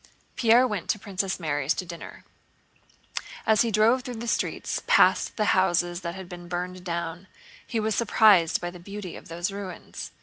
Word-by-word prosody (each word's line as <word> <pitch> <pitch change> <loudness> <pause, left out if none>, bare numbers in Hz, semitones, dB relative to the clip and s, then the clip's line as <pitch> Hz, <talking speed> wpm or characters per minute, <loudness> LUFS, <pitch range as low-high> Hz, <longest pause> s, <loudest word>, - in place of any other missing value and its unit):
Pierre 235 +2 +5
went 210 -7 -3
to - - +2
Princess 195 -2 -3
Mary's 145 -2 0
to 185 - -4
dinner. 170 -1 -10 1.2
As 220 -1 +4
he 235 - +2
drove 225 +4 +4
through 250 -1 -6
the 230 +1 -6
streets - - -1
past - - +4
the 210 -2 +3
houses 175 -1 +1
that 170 -1 -4
had 190 -1 -8
been 175 -1 -9
burned 180 +1 -4
down, 170 +1 -4 0.4
he 230 - -1
was 220 0 0
surprised 210 -6 +4
by 175 0 -4
the 180 - -11
beauty 200 0 -7
of - - -11
those 175 +3 -3
ruins. 195 -3 -7
185 Hz, 175 wpm, -26 LUFS, 175-215 Hz, 1.2 s, Pierre